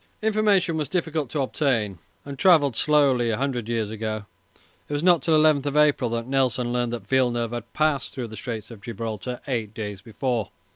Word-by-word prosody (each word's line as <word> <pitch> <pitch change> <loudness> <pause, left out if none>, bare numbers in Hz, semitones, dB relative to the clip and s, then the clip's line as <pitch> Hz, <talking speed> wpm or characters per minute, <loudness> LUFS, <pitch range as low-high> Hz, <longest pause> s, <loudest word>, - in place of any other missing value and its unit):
Information 205 -6 +2
was 150 -3 -2
difficult 160 -6 -1
to 145 - -1
obtain 115 - 0 0.3
and 140 -2 -8
travelled 150 -9 +5
slowly 140 -5 +3
a 110 - 0
hundred 125 -4 -2
years 110 -3 -1
ago. 110 -1 -4 0.6
It - - -4
was 145 +2 -1
not 175 -4 +5
till 160 +3 +3
11 150 -2 +3
April 145 -5 +3
that 115 0 -2
Nelson 125 -2 0
learned 120 -1 0
that 115 -5 -5
Villeneuve 120 -2 +1
had 120 -1 -6
passed 155 -4 +1
through 120 -3 -5
the 110 - -9
Straits 110 +1 -6
of 110 -3 -11
Gibraltar 115 +2 -5
eight 110 -5 -3
days 105 -3 -5
before. 115 0 -2
125 Hz, 185 wpm, -24 LUFS, 115-150 Hz, 0.6 s, travelled